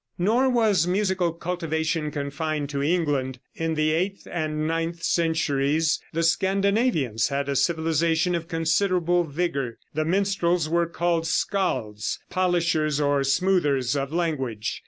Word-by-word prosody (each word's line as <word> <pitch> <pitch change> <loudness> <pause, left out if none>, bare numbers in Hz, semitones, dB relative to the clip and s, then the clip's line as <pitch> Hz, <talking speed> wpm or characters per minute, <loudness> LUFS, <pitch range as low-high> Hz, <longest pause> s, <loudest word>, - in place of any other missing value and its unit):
Nor 230 +9 +2
was 215 -9 +2
musical 190 -2 +1
cultivation 165 -2 -2
confined 150 0 -3
to 140 -1 -2
England. 145 -5 0 0.2
In 165 0 -2
the 155 0 +2
eighth 185 +5 -1
and 155 -2 -2
ninth 165 +1 -2
centuries 160 -2 +1
the 165 +1 -1
Scandinavians 190 - +1
had 140 0 -2
a 140 - -1
civilization 165 +2 +1
of 170 -1 -2
considerable 175 +1 +1
vigor. 140 -6 -2 0.2
The 155 - 0
minstrels 180 -2 +1
were 170 +1 +1
called 170 -1 0
Scalds, 115 - -1
polishers 170 -5 +1
or 145 -1 +2
smoothers 145 -4 +1
of 140 0 -2
language. 135 -10 -2
165 Hz, 125 wpm, -25 LUFS, 145-175 Hz, 0.2 s, Nor